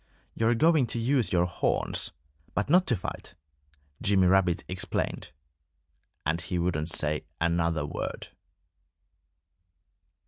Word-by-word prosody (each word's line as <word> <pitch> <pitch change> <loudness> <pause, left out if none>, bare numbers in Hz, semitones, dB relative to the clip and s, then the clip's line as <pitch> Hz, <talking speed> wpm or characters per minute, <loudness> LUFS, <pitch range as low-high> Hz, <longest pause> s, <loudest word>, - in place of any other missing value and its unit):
"You're 115 +1 +2
going 155 0 +4
to 115 - -3
use 125 0 +1
your 90 -1 +3
horns 90 - -1 0.4
but 105 +7 0
not 180 +2 +5
to 120 - +2
fight," 90 - -7 0.7
Jimmy 95 -2 +3
Rabbit 90 -2 +3
explained. 90 0 -3 0.9
And 80 +3 0
he 90 0 -3
wouldn't 85 -2 -1
say 75 -1 0
another 85 -2 +1
word. - - -5
90 Hz, 110 wpm, -28 LUFS, 85-115 Hz, 0.9 s, not